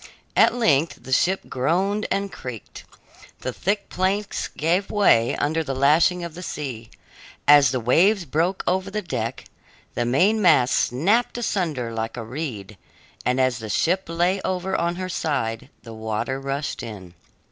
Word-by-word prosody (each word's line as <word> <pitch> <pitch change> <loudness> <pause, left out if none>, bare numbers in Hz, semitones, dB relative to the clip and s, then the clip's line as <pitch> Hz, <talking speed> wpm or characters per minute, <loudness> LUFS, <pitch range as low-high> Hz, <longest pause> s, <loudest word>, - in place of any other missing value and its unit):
At - - +5
length 160 - +1
the 130 - -9
ship 185 +8 +1
groaned 185 +11 0
and 200 0 -1
creaked; 125 -9 -9 0.6
the - - -3
thick 200 +1 -1
planks 200 +2 -1
gave 175 +6 0
way 120 - +3
under 160 +2 0
the 135 -3 -4
lashing 160 +6 +3
of 170 -2 -6
the 175 - -9
sea, 130 -10 -6 0.6
as 145 -1 +7
the 130 - -1
waves 175 - +3
broke 165 +7 0
over 190 +1 0
the 210 +1 -3
deck; 115 -10 -4 0.5
the 120 - -1
mainmast 170 - +3
snapped 200 - +1
asunder 160 - -2
like 115 +1 -4
a 115 - -4
reed, 110 -7 -6 0.5
and 125 +1 +1
as 130 -2 +1
the 110 -1 -7
ship 180 - +1
lay 175 +3 0
over 185 +1 -2
on 170 +1 0
her 185 +1 -4
side, 140 -10 -2
the 115 - -10
water 110 +4 -3
rushed 140 +1 -3
in. 95 -6 -9
155 Hz, 155 wpm, -23 LUFS, 125-185 Hz, 0.6 s, as